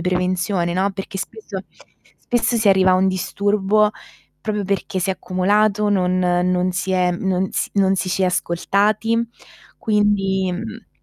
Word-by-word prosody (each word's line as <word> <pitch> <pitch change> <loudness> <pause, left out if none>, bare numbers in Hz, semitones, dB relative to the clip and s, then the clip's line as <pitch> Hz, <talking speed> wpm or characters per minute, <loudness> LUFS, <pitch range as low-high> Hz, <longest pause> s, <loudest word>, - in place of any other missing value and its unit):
prevenzione, 180 0 0
no, 190 +2 +1
perché 195 0 -6
spesso 440 - -6 0.5
spesso 240 -1 0
si 220 - 0
arriva 190 -1 +5
a - - +5
un 190 +1 +3
disturbo 205 +3 +1 0.5
proprio 210 -2 -2
perché 195 -1 -2
si 185 +2 0
è - - +2
accumulato, 205 +3 +1
non 185 -2 +1
non 180 0 +1
si 185 +1 -2
è 180 -1 +2
non 190 +1 -1
s - - -2
non 195 -1 +3
ci 185 - -2
si 190 - 0
è - - +4
ascoltati 210 +6 0 0.5
quindi, 200 -3 +1
mhmm 220 +4 -7
190 Hz, 150 wpm, -20 LUFS, 185-210 Hz, 0.5 s, arriva